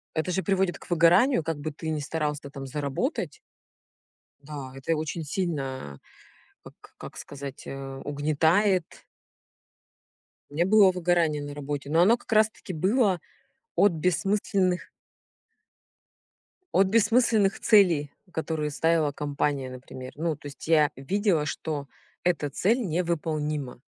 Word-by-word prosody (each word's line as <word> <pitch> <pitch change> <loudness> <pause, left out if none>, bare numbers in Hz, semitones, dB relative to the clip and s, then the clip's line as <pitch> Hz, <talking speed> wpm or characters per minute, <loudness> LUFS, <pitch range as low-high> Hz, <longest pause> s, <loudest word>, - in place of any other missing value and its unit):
Это 160 +3 -1
же 190 +1 -1
приводит 190 -2 +1
к - - -16
выгоранию, 175 - +4
как 165 -1 -2
бы 155 +2 -4
ты 160 +2 -6
не 155 -1 -1
старался 150 -1 -3
там 135 -1 -8
заработать. 140 0 -3 1.1
Да, 140 -3 -7
это 135 +5 -1
очень 160 +1 -3
сильно, 135 - -3 0.6
а, - - -10
как - - -17
как - - -10
сказать, 140 -1 -8
э, 135 0 -7
угнетает. 160 +6 +1 1.5
Не 160 +4 +1
было 200 -1 +6
выгорания 170 -4 +1
на 145 0 -6
работе. 145 -1 -5
Но 165 +3 +4
оно 225 +7 +5
как - - -14
раз 215 0 +5
таки 205 -4 -9
было 190 +2 +2 0.6
от 205 -3 +5
бессмысленных 185 +2 0 1.8
от 190 0 +5
бессмысленных 220 -1 +3
целей, 170 -9 +4 0.2
которые 160 -2 -2
ставила 160 -1 +2
компания, 145 -2 -2
например. 130 0 -9
Ну, 160 -1 -2
то 145 - -19
есть 140 +2 -10
я 155 -3 +5
видела, 180 +2 0
что 150 -2 -4 0.4
эта 160 -5 +1
цель 215 - +1
невыполнима 155 - -2
160 Hz, 130 wpm, -26 LUFS, 145-185 Hz, 1.8 s, было